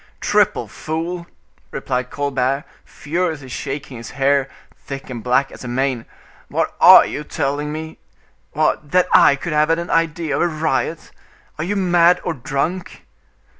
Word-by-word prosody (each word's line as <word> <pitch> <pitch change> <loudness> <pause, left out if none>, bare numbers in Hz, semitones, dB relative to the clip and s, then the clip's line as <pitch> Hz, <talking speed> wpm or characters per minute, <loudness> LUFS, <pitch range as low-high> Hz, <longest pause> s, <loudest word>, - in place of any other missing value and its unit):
"Triple - - +1
fool!" 170 +2 -4 0.4
replied 125 -1 -3
Colbert, 140 -1 -1 0.2
furiously 155 -3 -3
shaking 135 -1 -5
his 115 - -8
hair, 135 0 +2 0.3
thick 135 -1 -8
and 120 -3 -6
black 130 +2 +1
as - - -11
a - - -6
mane; 125 -1 -1 0.4
"what - - -1
are - - +9
you 150 - -5
telling 145 +1 -2
me? 160 +1 -7 0.5
What! 150 - 0
that 180 0 +5
I - - +7
could 155 +3 -5
have 150 +1 +3
had 165 - +3
an 170 +1 -4
idea 165 -1 0
of - - 0
a 175 - +3
riot! 160 0 -2 0.5
Are - - -1
you 200 +5 -2
mad 175 -2 +4
or 175 - -1
drunk?" 155 +7 -4
150 Hz, 155 wpm, -20 LUFS, 135-165 Hz, 0.5 s, are